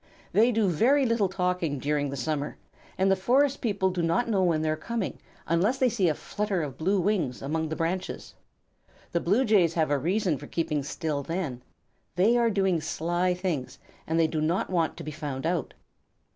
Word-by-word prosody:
They 230 +4 +4
do 220 -3 +2
very 255 - +3
little 230 -5 +2
talking 180 -5 -1
during 145 +1 -1
the 140 - -4
summer, 145 +2 -2 0.4
and 190 +1 +3
the - - +5
forest 260 +8 +2
people 200 -5 +1
do 180 -1 -2
not 170 +9 +1
know 205 -4 +1
when 165 -4 +2
they 155 - +1
are - - 0
coming, 215 +6 -4 0.3
unless 190 +10 +2
they 260 -1 +3
see 205 -7 +2
a 155 - 0
flutter 205 -2 -2
of 140 -3 -5
blue 190 +5 +2
wings 175 - 0
among 160 +3 -2
the 160 - -3
branches. 180 +3 -3 0.8
The 170 - +1
Blue 205 +11 +2
Jays 190 -7 +3
have 160 -3 +1
a 145 - +2
reason 180 0 0
for 145 - -9
keeping 160 -3 -1
still 145 +1 -3
then. 155 -5 -4 0.5
They 200 +7 +4
are 235 -1 +3
doing 190 -5 +1
sly 175 +3 0
things, 175 -8 -3 0.3
and 160 +1 +1
they 165 - +5
do 155 -1 -1
not 170 +5 0
want 170 -3 0
to - - -7
be 155 - -5
found 145 -2 -5
out. 170 -2 -1
175 Hz, 200 wpm, -27 LUFS, 155-200 Hz, 0.8 s, the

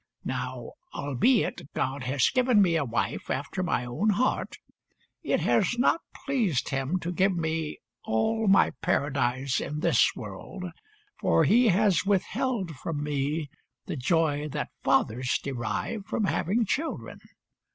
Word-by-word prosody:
Now, - - -4 0.2
albeit 145 - +1
God 130 0 -2
has 130 0 +2
given 250 -4 +3
me 180 -4 +4
a 160 - +2
wife 120 -3 -2
after 140 +8 -2
my 175 -8 0
own 125 - 0
heart, 225 +6 0 0.7
it - - 0
has 240 - +2
not 275 +6 +3 0.2
pleased 220 - 0
Him 135 +5 -1
to 175 - -3
give 190 +2 +2
me 160 -1 -2 0.3
all 220 - 0
my 195 - +5
Paradise 140 -5 0
in 150 +1 -4
this 165 -8 +3
world, 105 - -8 0.6
for - - +3
He 240 +2 +5
has 200 -1 +3
withheld 200 +1 0
from 150 +2 -4
me 145 +1 -2 0.3
the - - -4
joy 150 +1 +1
that 145 +1 -3
fathers 120 +3 +2
derive 135 - -3
from 220 - -1
having 205 +3 +1
children. 315 - -3
165 Hz, 135 wpm, -27 LUFS, 135-205 Hz, 0.7 s, my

